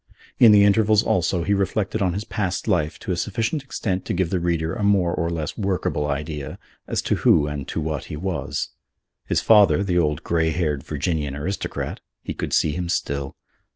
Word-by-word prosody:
In 115 -3 +8
the 105 -1 +7
intervals, 105 +1 +4
also, 85 -1 +1
he 100 - +1
reflected 100 +1 -1
on 90 -2 +1
his 100 +3 -3
past 95 -4 -3
life 80 -3 +1
to - - -4
a - - +1
sufficient 115 - -1
extent 100 -8 -3
to - - -2
give 85 -1 0
the 95 - +1
reader 85 -2 -1
a 120 - -5
more 100 -4 +3
or 85 -1 -1
less 80 +1 -4
workable 95 -7 -1
idea 75 0 -4 0.3
as - - -1
to - - 0
who 75 - +4
and 75 -2 -5
to - - -3
what 75 -4 -3
he - - -6
was. 90 +3 -3 0.6
His - - +1
father, 100 -6 +5
the 90 -3 +1
old 75 -3 0
grey 80 -1 +1
haired 80 -4 -1
Virginian 75 -1 -2
aristocrat, 90 +8 -4 0.2
he - - -4
could - - -4
see 75 - +2
him 85 +2 -3
still. 70 -5 -2
85 Hz, 195 wpm, -23 LUFS, 75-100 Hz, 0.6 s, In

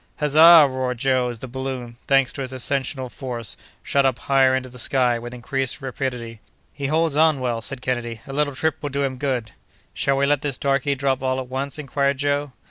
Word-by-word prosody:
"Huzza!" 155 +2 +8
roared 130 -2 -3
Joe, 130 0 +1
as 120 - -6
the 130 - -8
balloon—thanks 130 0 -1
to - - -5
its 130 -1 -4
ascensional 130 +1 -1
force—shot 125 +2 -3
up 130 -2 +2
higher 135 -1 +3
into 130 0 -2
the 125 0 -12
sky, 125 -1 +2
with 120 +1 -8
increased 130 +2 -3
rapidity. 125 -4 -5 0.3
"He 140 -1 -4
holds 160 0 +1
on 155 -2 +4
well," 120 -3 -2
said 125 +2 -5
Kennedy; 120 -3 -2
"a 135 - -8
little 145 -1 0
trip 160 +2 -1
will 145 - -3
do 140 0 -1
him 130 -1 -2
good." 125 -5 -2 0.4
"Shall 135 0 +1
we 140 - +2
let 145 0 +2
this 145 -4 -1
darky 140 0 0
drop 135 -1 0
all 130 0 0
at 130 -1 -6
once?" 135 +3 -3
inquired 140 -1 0
Joe. 145 0 -1
135 Hz, 200 wpm, -22 LUFS, 125-140 Hz, 0.4 s, Huzza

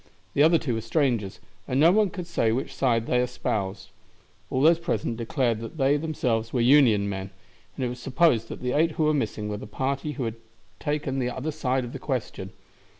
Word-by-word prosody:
The 140 - +2
other 165 +3 +6
two 140 -7 -2
were 115 - -2
strangers, 115 -5 0 0.3
and 130 - 0
no 165 +4 +7
one 210 0 +3
could 180 -1 -6
say 165 -10 +1
which 130 +4 -2
side 115 -4 +1
they 125 - +1
espoused. 110 -5 -3 0.6
All 130 - -1
those 165 +3 +5
present 170 -8 -2
declared 115 -1 0
that 115 +7 -8
they 140 0 +3
themselves 125 -7 -1
were 125 - 0
Union 120 -5 +5
men, 95 -1 -4 0.5
and 130 - -2
it - - -1
was 125 0 -7
supposed 130 -3 +2
that - - -7
the 125 0 -1
eight 160 +3 +2
who 155 - 0
were 155 0 +3
missing 110 -6 -2
were 105 0 -3
the 105 - -8
party 135 +6 -2
who 135 -1 -4
had 115 -1 -3 0.4
taken 145 -2 -2
the 125 -1 0
other 130 +5 -3
side 135 -4 -1
of 120 - -9
the - - -6
question. 120 -8 -4
130 Hz, 210 wpm, -26 LUFS, 115-150 Hz, 0.6 s, no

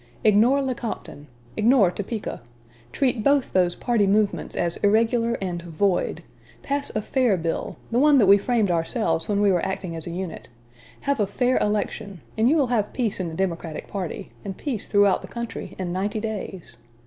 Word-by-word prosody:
Ignore 230 +6 +4
Lecompton; 235 - -5 0.3
ignore 215 -4 +4
Topeka; 205 - -5 0.5
treat 255 -5 0
both 280 0 +2
those 180 -2 +2
party 230 -5 +1
movements 205 +1 +1
as 170 -1 -1
irregular 230 +3 +2
and 180 -3 -3
void; 175 +3 -1 0.4
pass 285 0 -2
a 215 - 0
fair 245 -6 +2
bill 165 -1 -3
the 235 - +2
one 295 +1 +6
that 230 - +5
we 200 +1 +7
framed 220 -3 +1
ourselves 165 0 0
when 205 -1 +1
we 205 -1 +4
were 175 -2 +1
acting 185 -3 -3
as 165 0 -7
a - - -4
unit; 180 -1 -6 0.5
have 280 -2 0
a 205 - +2
fair 250 +5 +1
election 205 -3 -2
and 225 +2 +3
you 310 - +4
will 275 -5 +2
have 210 -3 0
peace 230 -7 -1
in 185 - -2
the 160 - -6
Democratic 170 -3 -3
party, 195 0 -5
and 195 -2 -6
peace 255 -9 -3
throughout 205 -2 +3
the - - -9
country, 235 -1 -6
in 180 -2 -3
ninety 205 +4 -1
days. 195 - -6
205 Hz, 180 wpm, -24 LUFS, 185-235 Hz, 0.5 s, we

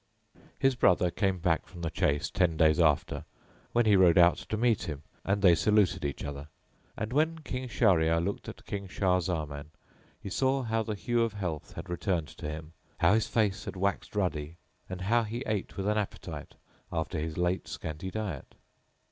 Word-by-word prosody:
His 135 0 +3
brother 90 -7 +3
came 95 +2 0
back 85 -2 0
from 85 -2 -10
the 80 - -1
chase 70 0 0
ten 90 -5 +1
days 80 0 +4
after, 80 -4 +2 0.5
when 120 0 +3
he 105 -2 +5
rode 90 -3 +6
out 85 0 +6
to 110 - -4
meet 115 -5 +1
him 75 -1 -6 0.2
and 100 +1 0
they 90 -3 +8
saluted 95 -1 +3
each 70 -1 -3
other; 70 0 -6 0.5
and 110 +3 -3
when 160 +3 +2
King 130 -2 -4
Shahryar 90 -7 +3
looked 95 +4 -3
at - - -11
King 100 -1 -4
Shah 90 -1 +1
Zaman 75 -5 -3 0.5
he - - -9
saw 130 +6 +1
how 115 -1 0
the 110 -1 -3
hue 120 +3 0
of 115 -2 +1
health 90 -7 -4
had - - -7
returned 85 -3 -1
to 75 - -7
him, 80 +1 -7 0.2
how - - +4
his 110 0 +2
face 105 -4 0
had - - -5
waxed 100 +2 -2
ruddy 85 -5 -1 0.3
and 95 0 -5
how 115 +5 +3
he 115 +3 -4
ate 105 -3 -3
with 95 - -2
an 105 +1 +2
appetite 105 - -6 0.4
after 80 0 -2
his 80 0 -4
late 90 +1 0
scanty 80 +4 -5
diet. 95 -8 -5
95 Hz, 190 wpm, -30 LUFS, 80-105 Hz, 0.5 s, they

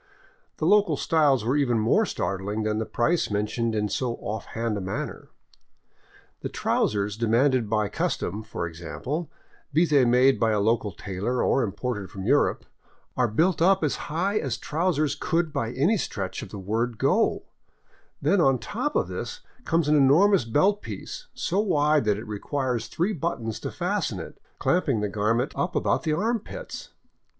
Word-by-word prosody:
The - - -2
local 205 +3 +4
styles 145 - +2
were 125 +4 +1
even 130 -5 +2
more 110 0 +3
startling 100 +4 -2
than 110 0 0
the 110 - -3
price 165 +8 +1
mentioned 110 +2 -1
in 105 0 0
so 120 +4 -2
off 105 +1 -5
hand 115 -1 -2
a 100 - -3
manner. 95 +1 -5 1.1
The - - -4
trousers 100 -1 0
demanded 115 +1 +2
by 105 -1 +1
custom, 105 +2 -2
for 110 -5 -5
ex 85 0 -11
ample, 150 - -4 0.4
be 160 +4 +4
they 145 -5 +4
made 125 +2 +4
by 110 -1 +2
a 105 - +1
local 110 0 +1
tailor 100 +7 -2
or 135 - +2
imported 105 -2 -3
from 95 +1 -7
Europe, - - +2 0.5
are 125 -1 +2
built 160 - +1
up 190 +1 +4
as 150 - +1
high 190 +7 0
as 130 -6 -2
trousers 155 -3 0
could 165 +1 -1
by 115 0 -1
any 160 - +2
stretch 95 - -4
of - - -8
the 105 - -8
word 110 +4 -2
go; - - +2 0.8
then 175 +6 +3
on 135 -4 +4
top 225 - -3
of - - +2
this - - -6 0.2
comes 165 -2 +1
an 150 - +4
enormous 150 - +5
belt 190 - +2
piece, - - -7
so 185 +3 -1
wide 150 - +2
that 105 -1 +2
it 110 - -7
requires 120 +2 -2
three 185 +6 -1
buttons 130 - -3
to - - -4
fasten - - -2
it, - - -9 0.2
clamping 140 -11 +1
the 105 - 0
garment 110 +5 0
up 175 - -2
about - - +1
the 155 -2 0
armpits. 220 +6 -3
125 Hz, 170 wpm, -26 LUFS, 110-160 Hz, 1.1 s, enormous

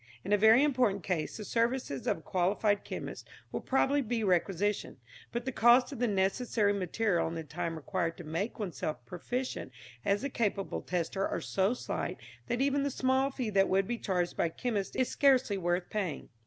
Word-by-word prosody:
In 205 - 0
a - - +8
very 220 +6 +6
important 245 - +2
case 170 -5 -2
the 210 - -6
services 230 - -1
of - - +2
a - - -13
qualified 205 +3 +1
chemist - - -6 0.2
will - - -3
probably 275 +2 +2
be 235 -2 -1
requisitioned, 195 +2 0 0.3
but 235 +1 -3
the 260 - -1
cost 245 +1 +5
of - - -7
the 245 - +2
necessary 205 +1 +1
material 195 0 0
and 165 +1 -4
the 160 - -4
time 165 +2 -4
required 165 +2 -2
to 175 - -8
make 165 +8 -3
oneself 180 -6 -4
proficient 245 +8 -4 0.3
as 200 +3 +1
a 280 - -1
capable 205 -5 -1
tester 180 +2 -1
are - - -2
so 195 +5 +1
slight - - -3 0.3
that 240 +1 -1
even 280 +1 +2
the 285 - 0
small 260 +1 +1
fee 255 -5 -3
that 195 -1 +3
would 195 +1 +3
be 240 -1 -2
charged 180 -2 -1
by - - +1
a - - -4
chemist 205 +2 -3
is 255 - +2
scarcely 255 -8 +3
worth 175 0 0
paying. 190 -9 -3
205 Hz, 195 wpm, -31 LUFS, 180-245 Hz, 0.3 s, a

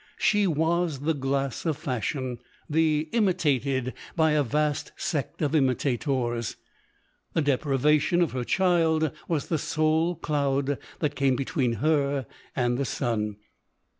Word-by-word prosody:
She 205 -1 +3
was 160 -2 0
the 160 +3 +1
glass 135 -2 -2
of 160 -4 0
fashion 130 -1 -3
— - - -32
the 155 0 +2
imitated 140 - +1 0.2
by 160 -2 +3
a 150 0 +3
vast 150 +3 0
sect 150 -1 -2
of 145 - 0
imitator. 130 -3 +1 0.9
The 165 - +2
deprivation 145 +4 +2
of 165 - -1
her 125 -1 -2
child 165 -2 +2 0.2
was 160 -4 0
the 160 - +1
sole 160 +3 +1
cloud 140 -3 0 0.2
that 150 -2 +1
came 135 -2 +2
between 130 -1 0
her 140 +1 +1 0.3
and 120 -1 +1
the 140 - 0
sun. 110 -6 -1
145 Hz, 135 wpm, -26 LUFS, 130-160 Hz, 0.9 s, She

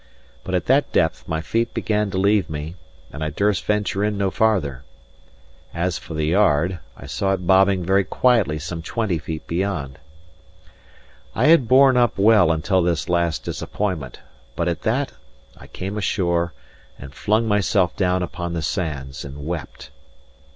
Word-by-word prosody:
But 95 - -3
at 90 - -1
that 135 +3 +2
depth 80 -1 0
my 80 0 -2
feet 115 +8 -1
began 105 -1 0
to 95 - -4
leave 100 0 +2
me, 75 +1 -5 0.4
and 75 - -5
I 80 - -1
durst 100 +6 0
venture 105 -1 0
in 105 -1 0
no 100 -1 0
farther. 90 - +1 0.9
As 90 +1 -1
for 80 - -9
the 75 0 0
yard, 85 0 +2 0.2
I - - -11
saw 95 -1 -1
it 90 -2 -3
bobbing 95 0 +4
very 95 +2 +3
quietly 110 -10 +2
some 80 +2 -5
twenty 95 -1 -2
feet 80 +2 -6
beyond. 85 -7 -3 1.4
I 125 - +2
had 165 -8 +5
borne 130 +1 +6
up 120 -1 +2
well 105 -4 +5
until 90 +4 +1
this 85 -2 -1
last 85 -2 0
disappointment; 90 -11 -4 0.3
but 85 - -1
at 85 -2 -2
that 130 +5 0 0.4
I - - -14
came 100 +3 -5
ashore, 85 -3 0 0.5
and 70 0 -11
flung 110 +8 +1
myself 100 -3 +1
down 90 -1 +1
upon 85 -1 -5
the 85 -2 -3
sands 70 -4 -3
and 70 +1 -8
wept. 75 -4 -6
90 Hz, 160 wpm, -22 LUFS, 80-105 Hz, 1.4 s, borne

